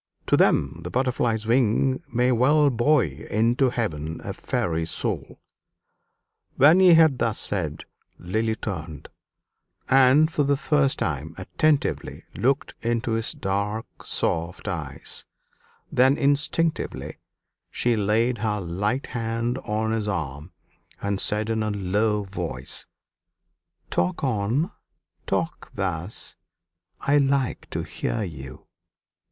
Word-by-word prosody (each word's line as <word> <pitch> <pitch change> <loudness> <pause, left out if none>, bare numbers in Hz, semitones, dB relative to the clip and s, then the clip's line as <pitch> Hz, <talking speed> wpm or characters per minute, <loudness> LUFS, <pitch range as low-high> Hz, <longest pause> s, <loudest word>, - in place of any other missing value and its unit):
To - - +3
them 70 +4 +2
the 85 - -6
butterfly's 120 -2 0
wing 125 +2 +2
may 125 +1 +2
well 140 +4 +4
buoy 120 - +1
into 120 +5 +2
heaven 80 -10 -3
a - - -4
fairy's 80 -1 -2
soul!" - - -4 1.2
When 155 +7 +6
he 180 -3 +8
had 160 -6 +5
thus 110 -3 0
said, 80 -7 -2 0.3
Lily 110 +5 -1
turned, 80 - -6 0.8
and 135 +4 +5
for 150 - 0
the 140 0 +2
first 145 -2 +2
time 75 +3 -3
attentively 145 +10 0
looked 135 +6 0
into 115 +1 -1
his 110 0 0
dark 100 +3 -2 0.2
soft 85 +1 -2
eyes; - - -4 0.7
then 130 +3 +4
instinctively 150 +3 0 0.5
she 120 -1 +1
laid 110 +3 +1
her 105 -1 0
light 100 +8 -1
hand 115 +1 -2
on 110 0 -1
his 110 -2 -1
arm, 75 -4 -4 0.5
and 100 -1 -2
said 105 +1 +1
in 110 -1 0
a 110 - 0
low 105 +2 0
voice, 95 0 -5 1.0
"Talk 90 - 0
on 125 +5 0 0.6
talk - - -2
thus; 85 +6 -3 0.7
I 140 +1 +3
like 135 -2 0
to - - -3
hear 110 - -3
you." 65 -8 -8
110 Hz, 115 wpm, -25 LUFS, 95-130 Hz, 1.2 s, he